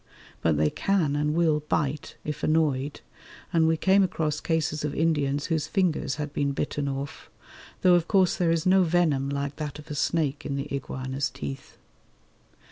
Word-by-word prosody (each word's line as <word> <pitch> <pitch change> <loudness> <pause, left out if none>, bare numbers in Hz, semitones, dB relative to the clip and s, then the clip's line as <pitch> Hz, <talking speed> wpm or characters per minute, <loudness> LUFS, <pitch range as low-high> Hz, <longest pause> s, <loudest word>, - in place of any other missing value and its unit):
But 80 -2 +2
they 75 0 +2
can 175 -8 +1
and 150 +1 0
will 160 -3 +3
bite, 150 -1 -2
if 150 -1 -4
annoyed, 150 -3 +1 0.5
and 165 -1 +4
we 160 0 +2
came 190 +4 +4
across 155 -5 0
cases 155 -2 -1
of 150 -1 -2
Indians 145 -3 +1
whose 160 -3 -1
fingers 155 -8 0
had 150 -1 -5
been 140 -1 0
bitten 145 0 -2
off, 140 +1 -5 0.5
though 180 - +6
of 175 -1 +3
course 190 -4 +3
there 175 -2 +1
is 165 -1 +1
no 190 +1 +5
venom 160 -6 +2
like 140 0 -3
that 150 -2 -5
of 150 +1 -11
a - - -2
snake 150 -1 0
in 140 - -3
the 140 +1 -3
iguana's 130 0 -3
teeth. 70 -2 -7
150 Hz, 175 wpm, -26 LUFS, 140-165 Hz, 0.5 s, though